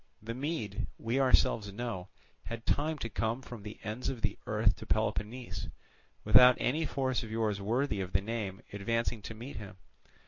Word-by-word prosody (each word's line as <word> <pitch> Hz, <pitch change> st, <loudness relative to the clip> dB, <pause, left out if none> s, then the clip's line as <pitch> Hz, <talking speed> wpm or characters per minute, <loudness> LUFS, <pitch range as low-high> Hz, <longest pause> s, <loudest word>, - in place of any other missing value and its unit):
The 115 Hz, +2 st, -5 dB
Mede, 125 Hz, -, -2 dB
we 115 Hz, +4 st, 0 dB
ourselves 125 Hz, -5 st, +4 dB
know, 100 Hz, -4 st, -4 dB, 0.4 s
had 115 Hz, 0 st, -6 dB
time 155 Hz, +2 st, +1 dB
to 115 Hz, -, -3 dB
come 115 Hz, +3 st, -1 dB
from 120 Hz, -4 st, -8 dB
the 105 Hz, +1 st, -8 dB
ends 110 Hz, +5 st, -2 dB
of 125 Hz, -4 st, -5 dB
the 100 Hz, -2 st, +2 dB
earth 105 Hz, -2 st, +3 dB
to -, -, -9 dB
Peloponnese, 110 Hz, +3 st, -1 dB, 0.6 s
without 120 Hz, +4 st, +8 dB
any 155 Hz, +5 st, +1 dB
force 130 Hz, -2 st, 0 dB
of 115 Hz, -, -7 dB
yours 110 Hz, -2 st, 0 dB
worthy 110 Hz, 0 st, +1 dB
of 95 Hz, -1 st, -4 dB
the -, -, +3 dB
name 105 Hz, -2 st, -4 dB
advancing 115 Hz, +2 st, 0 dB
to 110 Hz, -, -7 dB
meet 120 Hz, +6 st, -7 dB
him. 95 Hz, -3 st, -8 dB
115 Hz, 175 wpm, -32 LUFS, 105-125 Hz, 0.6 s, without